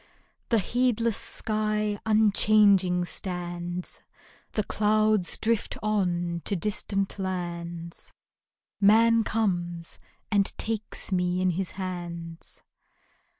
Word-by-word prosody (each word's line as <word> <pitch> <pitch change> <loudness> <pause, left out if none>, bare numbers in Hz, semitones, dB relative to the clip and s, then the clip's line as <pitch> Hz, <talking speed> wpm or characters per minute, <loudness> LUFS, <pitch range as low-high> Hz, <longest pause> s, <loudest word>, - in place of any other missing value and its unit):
The 230 - +4
heedless 230 +1 +1
sky 215 -1 -1
unchanging 205 -4 +4
stands; 175 -1 -5 0.5
The 215 - 0
clouds 215 -3 +2
drift 225 -1 0
on 175 -5 0
to 200 - +3
distant 195 +1 -1
lands; 170 -2 -5 0.7
Man 225 +3 +5
comes 175 -7 -2 0.3
and 200 -2 +2
takes 220 -2 -2
me 180 -1 +1
in 185 0 +2
his 180 +1 -3
hands. 170 -3 -7
195 Hz, 90 wpm, -27 LUFS, 175-215 Hz, 0.7 s, Man